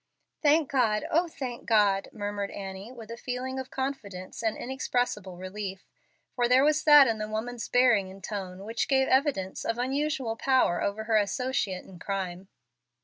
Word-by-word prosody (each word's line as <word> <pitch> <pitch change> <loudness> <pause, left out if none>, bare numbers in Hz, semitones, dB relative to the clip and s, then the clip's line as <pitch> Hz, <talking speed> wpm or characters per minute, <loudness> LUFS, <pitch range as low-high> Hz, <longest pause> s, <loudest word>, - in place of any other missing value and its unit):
"Thank 300 -1 +3
God, 230 -6 +2
oh, 340 +3 +3
thank 255 -7 -6
God," 205 -3 +3
murmured 205 -2 -3
Annie, 195 +3 -7
with 230 -3 -10
a 230 - -6
feeling 255 +2 -4
of 260 - -6
confidence 210 -10 -5
and 225 -2 0
inexpressible 245 -7 -2
relief, 190 +1 -6 0.5
for 245 -1 +1
there 255 +2 +6
was 305 +1 +3
that 295 -2 +9
in 225 -3 0
the 215 0 -3
woman's 230 +2 -4
bearing 240 -6 +4
and 190 0 -13
tone 190 -2 -5
which 225 +1 -1
gave 265 -1 +3
evidence 260 -9 +1
of 230 - -1
unusual 265 -1 -1
power 255 -8 +2
over 200 +2 -1
her 220 0 +2
associate 205 -3 -1
in 180 -2 -13
crime. 190 -1 -4
225 Hz, 165 wpm, -28 LUFS, 200-260 Hz, 0.5 s, that